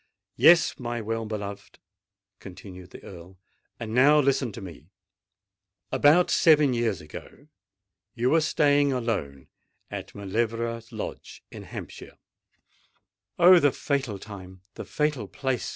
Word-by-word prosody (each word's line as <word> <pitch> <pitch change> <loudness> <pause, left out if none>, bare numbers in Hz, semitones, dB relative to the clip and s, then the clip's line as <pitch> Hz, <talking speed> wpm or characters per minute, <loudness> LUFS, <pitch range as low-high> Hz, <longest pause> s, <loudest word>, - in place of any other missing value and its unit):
"Yes, 170 0 +5
my 120 -1 -4
well 115 0 -4
beloved," 100 -2 -7 0.6
continued 90 -1 -12
the - - -13
Earl. 90 0 -12 0.4
"And 110 -1 -6
now 145 +5 +5
listen 135 -3 +1
to - - -8
me. 85 -5 -11 1.0
About 160 +5 +4
seven 150 -5 +4
years 115 -7 -1
ago 75 -1 -12 0.7
you 120 +2 0
were 165 - +4
staying 145 -1 +2
alone 100 - -3 0.4
at - - -8
Mauleverer 115 +3 -2
Lodge - - -8
in - - -10
Hampshire——" - - -10 1.2
"Oh! 180 +1 +7
the 145 -3 +3
fatal 135 -8 -3
time—the 95 -2 -11
fatal 150 -8 -2
place!" 130 0 -3
115 Hz, 120 wpm, -25 LUFS, 100-140 Hz, 1.2 s, Oh